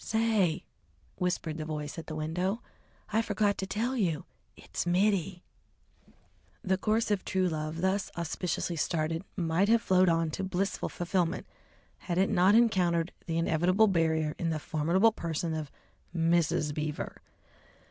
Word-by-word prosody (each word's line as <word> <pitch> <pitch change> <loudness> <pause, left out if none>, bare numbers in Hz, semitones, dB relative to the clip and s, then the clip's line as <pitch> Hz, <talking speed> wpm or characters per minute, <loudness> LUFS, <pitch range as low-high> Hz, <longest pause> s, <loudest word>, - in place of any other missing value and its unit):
"Say!" 220 -7 +1 0.5
whispered 175 -3 -2
the 155 - -3
voice 150 0 -4
at 160 - -9
the 155 - -5
window, 180 +8 -2 0.5
"I 220 - +4
forgot 210 -2 +1
to 190 - -2
tell 235 +6 -1
you 175 - 0 0.3
It's - - -4
Mittie." 185 -1 +1 1.2
The 190 0 +1
course 215 +2 +1
of 200 -2 +1
true 185 -1 +1
love 155 0 -3
thus 190 +1 +1
auspiciously 170 0 -2
started 165 +2 -1
might 175 +3 +1
have 230 0 +4
flowed 185 -1 +4
on 165 -1 +1
to 195 - -3
blissful 190 +1 -1
fulfilment 175 0 -1 0.5
had 175 -2 -3
it 190 +3 +3
not 195 +1 +5
encountered 180 -7 +3 0.2
the 165 -1 -1
inevitable 175 +5 +3
barrier 160 -5 +1
in 170 - 0
the 160 - 0
formidable 170 +8 +2
person 165 -4 -3
of 155 -2 -4 0.5
Mrs. 165 -2 +2
Beaver. 150 0 -4
175 Hz, 145 wpm, -30 LUFS, 160-195 Hz, 1.2 s, not